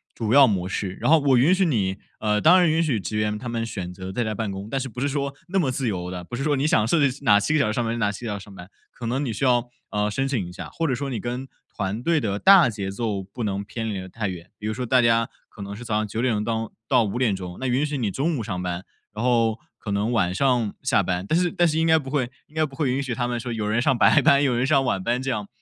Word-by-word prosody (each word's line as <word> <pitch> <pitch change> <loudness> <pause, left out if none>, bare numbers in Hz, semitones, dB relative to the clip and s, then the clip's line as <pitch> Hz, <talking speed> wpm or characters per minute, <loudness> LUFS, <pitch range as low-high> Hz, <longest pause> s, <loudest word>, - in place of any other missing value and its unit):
主 110 -1 -1
要 140 0 +8
模 95 -5 -1
式。 95 0 -4
然 - - 0
后 160 +1 +7
我 140 -3 +3
允 140 +9 +5
许 190 0 +2
你 100 - 0 0.2
呃， 105 -1 +1
当 180 +3 +7
然 175 -2 +4
允 160 +1 +2
许 135 -9 0
职 95 +3 -4
员 105 0 0
他 125 - -7
们 115 -1 -2
选 95 -5 -5
择 95 +1 -7
在 120 +5 -1
家 110 -1 -2
办 105 -1 -3
公， 95 +1 -6
但 135 - -1
是 135 0 -4
不 120 - -8
是 140 - +1
说 140 0 -2
那 190 +2 0
么 140 -8 +1
自 130 0 -2
由 90 -4 -3
地， 90 -1 -6
不 120 - -7
是 130 - -3
说 150 -1 +2
你 135 +1 0
想 110 -8 +3
设 165 - +2
置 130 +1 -5
哪 105 -6 +6
7 150 - 0
个 155 - +3
小 140 - +2
时 110 - -1
上 120 +1 -1
班， 115 +1 -2
哪 105 -3 +1
7 110 +4 -8
个 110 - -2
小 100 - -4
时 - - -11
上 100 - -13
班， 90 0 -11 0.2
可 120 - -9
能 130 +5 -1
你 130 - -2
需 110 +5 -2
要， 120 -1 +2 0.2
呃， 105 0 0
申 135 +6 -1
请 115 -10 -1
一 - - -9
下 90 - -8
或 165 - -1
者 130 - 0
说 140 +2 -4
你 125 - -3
跟 125 +2 -4 0.3
团 100 +2 -2
队 165 +1 +2
的 105 -6 -2
大 190 - +7
节 100 -3 -4
奏 100 -1 -2
不 100 +6 -7
能 100 -1 -2
偏 115 +2 -5
离 100 -3 -3
得 95 0 -8
太 105 +2 -3
远， 90 -1 -7
比 105 - -9
如 110 - -1
说 125 +2 -4
大 125 +1 +4
家 115 -1 +3 0.2
可 105 - -13
能 100 +1 -6
是 120 +3 -9
早 115 - -3
上 110 0 0
9 115 +4 0
钟 105 0 -1
当 115 0 -2 0.2
到 120 - +4
5 110 0 0
钟， 90 -2 -7
那 130 - -2
允 130 +4 +1
许 150 -1 -3
你 110 -6 -1
中 155 - 0
午 115 - -3
上 95 -5 -4
班， 90 0 -3 0.3
然 105 +2 -4
后 115 -3 +2 0.2
可 110 - -7
能 100 +3 0
晚 95 -7 +1
上 120 -2 +1
下 - - +3
班。 90 0 -2
但 160 - +2
是 175 -1 +1
但 175 -3 +2
是 160 0 0
应 165 - +2
该 160 0 +5
不 135 -4 -5
会 135 -5 0 0.2
应 150 - -24
该 155 - +2
不 140 -3 -4
会 145 -4 0
允 135 +2 0
许 130 -4 -3
他 120 +1 -1
们 120 -1 -2
说 120 +1 -5
有 110 -2 -2
人 110 +3 +1
上 130 0 +2
白 145 - +5
班， 140 +2 +5
有 135 -3 +2
人 120 +2 +1
上 135 -2 +3
晚 100 -6 -1
班 120 +3 0
这 130 +1 -2
样， 105 -4 -3
115 Hz, 330 characters per minute, -24 LUFS, 105-135 Hz, 0.3 s, 要